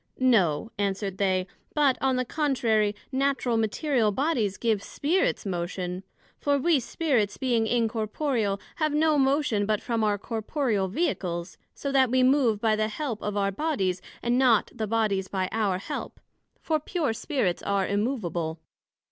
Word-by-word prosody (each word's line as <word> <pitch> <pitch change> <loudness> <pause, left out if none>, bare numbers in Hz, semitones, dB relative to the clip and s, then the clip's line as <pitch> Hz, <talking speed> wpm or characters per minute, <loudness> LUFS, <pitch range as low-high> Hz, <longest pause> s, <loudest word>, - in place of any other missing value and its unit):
No, 220 - +2
answered 195 -1 -2
they; 185 -2 +1 0.3
but, 285 -4 +4
on 265 -1 +2
the 255 0 0
contrary, 230 -8 +1 0.2
Natural 265 -3 +1
material 225 +1 +1
bodies 235 -6 0
give 220 -4 +1
Spirits 315 - 0
motion; 180 0 -3 0.4
for 285 -1 +2
we 310 +1 +3
Spirits, 245 - 0
being 240 -4 +1
incorporeal, 225 -1 0 0.2
have 305 -2 0
no 305 -1 +3
motion 270 -7 +2
but 215 -1 +1
from 230 -2 -1
our 210 -1 +2
Corporeal 220 -1 -1
Vehicles, 180 - -2 0.2
so 280 - -3
that 265 -2 +4
we 255 +1 +3
move 255 -5 +3
by 220 0 +2
the 215 0 0
help 230 0 -4
of 210 0 -3
our 200 -1 +1
Bodies, 195 - -1 0.2
and 240 +1 +2
not 245 -5 +4
the 220 -3 -3
Bodies 205 -3 0
by 190 -1 -1
our 205 -4 +1
help; 190 - -6 0.4
for 315 -1 +1
pure 305 -4 -1
Spirits 225 - -1
are 200 -1 0
immovable. 185 -8 -2
225 Hz, 150 wpm, -27 LUFS, 200-270 Hz, 0.4 s, but